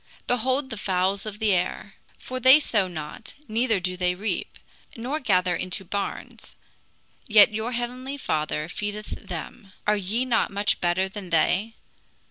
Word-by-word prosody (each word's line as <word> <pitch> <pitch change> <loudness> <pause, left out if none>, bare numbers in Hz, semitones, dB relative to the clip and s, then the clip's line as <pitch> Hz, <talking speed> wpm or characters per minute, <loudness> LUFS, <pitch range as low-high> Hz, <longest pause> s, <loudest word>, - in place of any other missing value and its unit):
Behold 260 +3 0
the 225 - -4
fouls 195 +1 0
of 210 -1 -5
the 215 -2 +2
air; 180 -1 -1 0.2
for 255 0 -5
they 260 +4 +8
sow 210 -9 +1
not, 155 -4 -8
neither 225 -1 +1
do 180 0 -2
they 180 0 +1
reap, 195 -1 -3 0.4
nor 260 +7 -2
gather 185 - +2
into 185 +1 -3
barns; 200 +3 -5 0.7
yet 215 -1 +7
your 220 +3 -2
heavenly 250 +3 -3
Father 155 - -1
feedeth 210 +3 -4 0.2
them. 200 -6 -7
Are 210 - +4
ye 210 +6 -1
not 245 -3 +2
much 205 +1 0
better 175 +2 +2
than 190 -1 -8
they? 190 +7 +2
205 Hz, 150 wpm, -25 LUFS, 185-240 Hz, 0.7 s, they